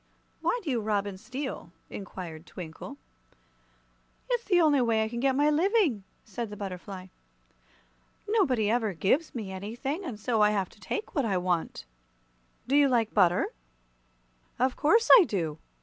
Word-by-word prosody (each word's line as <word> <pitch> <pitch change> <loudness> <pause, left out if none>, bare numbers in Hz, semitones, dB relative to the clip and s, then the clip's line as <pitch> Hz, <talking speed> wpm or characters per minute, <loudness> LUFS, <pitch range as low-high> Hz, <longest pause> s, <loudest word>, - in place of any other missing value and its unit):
"Why - - +1
do 305 - -2
you 240 -3 0
rob 205 -1 0
and 195 -2 -6
steal?" 255 -5 -6 0.2
inquired 175 -5 -8
Twinkle. 160 -3 -9 1.3
"It's 485 -1 +1
the 360 -3 +3
only 300 -5 +4
way 225 -2 +2
I - - -1
can 235 +1 -5
get 265 +1 +2
my 295 +2 +3
living," 330 - +2 0.2
said 225 +1 -5
the 210 - -8
butterfly. 190 -1 -7 1.2
"Nobody 270 - +2
ever 220 -2 +1
gives 260 - 0
me 210 -5 -5
anything, 235 - -4
and 245 - -6
so 220 0 0
I 210 - +6
have 195 -3 -1
to - - -20
take 425 - -4
what 280 - +1
I 195 -4 +1
want." 175 - -2 0.8
"Do 270 - +1
you 285 -1 +5
like 230 -3 +1
butter?" 180 -4 +3 1.1
"Of 255 +1 +1
course 450 +10 +3
I - - +6
do! 165 - -3
225 Hz, 160 wpm, -28 LUFS, 195-285 Hz, 1.3 s, I